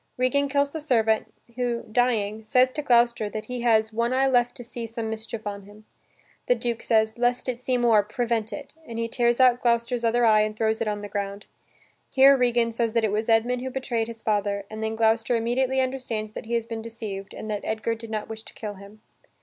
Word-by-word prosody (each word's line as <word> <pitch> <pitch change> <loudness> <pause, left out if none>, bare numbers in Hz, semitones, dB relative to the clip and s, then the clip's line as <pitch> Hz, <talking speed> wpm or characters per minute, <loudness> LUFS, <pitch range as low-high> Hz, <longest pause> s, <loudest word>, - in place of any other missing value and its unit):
Regan 275 +3 +1
kills 280 0 +1
the 315 - -5
servant, 225 -7 +1 0.3
who, 240 -2 -1
dying, 220 -2 0
says 250 +4 +3
to 300 - -4
Gloucester 235 -5 +3
that 215 +1 -5
he 250 -1 -5
has 220 -2 +2
"one 235 +3 0
eye 265 +1 +3
left 245 -2 +2
to 245 - -8
see 235 -1 -6
some 225 0 -4
mischief 220 0 -6
on 200 -1 -4
him." 210 +1 -16 0.6
The 245 - +4
Duke 235 -1 -2
says, 220 0 +1
"Lest 245 +1 +1
it 250 -1 -3
see 250 0 0
more, 235 -3 +4
prevent 225 0 -2
it," 285 -2 -8
and 230 - -6
he 230 0 -1
tears 240 +1 +1
out 250 -1 +5
Gloucester's 235 0 +1
other 235 +1 +3
eye 215 -1 +5
and 215 0 -1
throws 220 0 0
it 230 - 0
on 205 -1 -2
the - - -4
ground. 200 0 -4 0.6
Here 275 +1 +7
Regan 240 -2 +2
says 230 -1 -1
that 230 -1 +2
it 215 - +1
was 215 +2 -1
Edmund 240 +2 +2
who 260 - -3
betrayed 245 -3 -2
his 230 -1 -10
father 205 -2 0
and 220 0 -5
then 220 0 -2
Gloucester 225 +1 +2
immediately 250 +3 +1
understands 250 -5 -3
that 215 - -8
he 235 - -1
has 230 -1 0
been 230 -1 -5
deceived 215 -4 -7
and - - -7
that 205 -1 -2
Edgar 220 +1 -1
did 230 0 -9
not 215 -1 -3
wish 220 0 -7
to - - -15
kill 210 -2 -5
him. 200 +2 -14
230 Hz, 225 wpm, -25 LUFS, 220-245 Hz, 0.6 s, Here